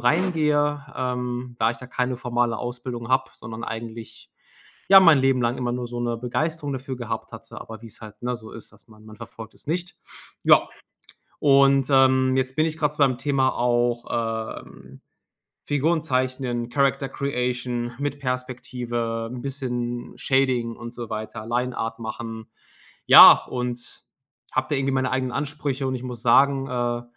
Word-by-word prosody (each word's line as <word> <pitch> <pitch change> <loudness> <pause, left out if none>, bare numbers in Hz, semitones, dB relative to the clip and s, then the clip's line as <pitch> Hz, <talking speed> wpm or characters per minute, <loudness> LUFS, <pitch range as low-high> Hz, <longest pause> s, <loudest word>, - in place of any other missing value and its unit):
reingehe, 150 0 +1
ähm, 125 -1 -3
da 115 +1 +4
ich 120 - -6
da 125 - -10
keine 125 0 -2
formale 120 -2 -1
Ausbildung 120 -1 -6
habe, 130 +1 +1
sondern 115 0 -8
eigentlich, 115 0 -8 0.6
ja, 195 0 +10
mein 165 -6 +7
Leben 135 -1 +2
lang 120 +2 0
immer 125 -1 -1
nur 125 0 -3
so 120 0 -5
'ne 120 -1 -1
Begeisterung 145 +5 -2
dafür 130 0 -5
gehabt 120 -2 -5
hatte. - - -10
Aber 110 -1 -10
wie's 115 -2 -13
halt, 110 -2 -12
ne, 125 0 -1
so 110 -1 -12
ist, 115 - -11
dass - - -23
man 110 -1 -18
man 110 0 -12
verfolgt 115 0 -11
es - - -20
nicht. 175 +2 -3 0.5
Ja, - - +6 0.7
und, 140 -1 +5
ähm, 130 -1 +4
jetzt 130 0 -1
bin 155 +1 +2
ich 160 0 -3
grad 150 -2 0
so - - -23
beim 130 -4 +3
Thema 135 -2 +1
auch, 120 0 +1 0.6
ähm, - - -15 0.6
Figuren 155 +3 +1
zeichnen, 130 -4 -2
Character 140 +1 +1
Creation, 125 -3 -2
mit 145 0 -3
Perspektive, 125 -3 -3
'n 125 - -6
bisschen 125 -3 -4
Shading 130 -4 +1
und 120 0 -8
so 120 -2 -7
weiter 110 0 -6
Lineart 120 -1 -2
machen, 110 0 -6 0.6
ja, - - +11
und 125 -1 -5 0.5
habe - - 0
da - - +1
irgendwie 135 0 0
meine 130 -1 0
eigenen 130 -1 0
Ansprüche. 140 -1 -3
Und 130 - -2
ich 125 - -8
muss 125 -2 -7
sagen, 135 +3 +4
äh, 120 -1 -1
125 Hz, 165 wpm, -24 LUFS, 120-135 Hz, 0.7 s, ja